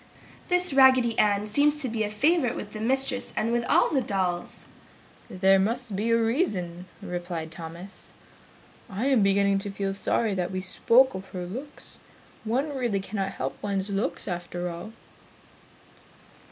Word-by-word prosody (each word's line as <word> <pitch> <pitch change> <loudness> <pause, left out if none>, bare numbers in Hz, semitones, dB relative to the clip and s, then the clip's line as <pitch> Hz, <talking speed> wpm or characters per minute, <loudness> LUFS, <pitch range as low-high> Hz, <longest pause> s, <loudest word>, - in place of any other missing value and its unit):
"This 360 -3 +1
Raggedy 260 -3 +5
Ann 205 -1 +3
seems 290 +7 +2
to - - -1
be 225 -2 -3
a 210 - 0
favorite 270 +4 +2
with 210 - -6
the 215 - -6
mistress 255 +2 0
and 225 +2 0
with 240 0 +1
all - - +3
the 275 -4 +2
dolls!" 185 -6 -2 0.6
"There 190 +1 +4
must 230 +2 -1
be 215 +4 -1
a 230 - +4
reason!" 205 - -1 0.2
replied 175 -2 -5
Thomas, 170 +4 -9 0.8
"I 200 +6 -3
am 270 -5 +4
beginning 200 0 +3
to 200 +1 -4
feel 195 0 -3
sorry 210 +2 0
that 180 -2 -1
we 185 - -3
spoke 235 +8 +3
of 190 +1 -7
her 180 -1 -6
looks. 260 +11 -9 0.5
One 270 +6 -1
really 240 -6 0
cannot 195 0 -3
help - - -5
one's 200 -1 -2
looks 200 +6 -2
after 175 -1 -4
all." 170 +6 -7
205 Hz, 155 wpm, -26 LUFS, 190-250 Hz, 0.8 s, Raggedy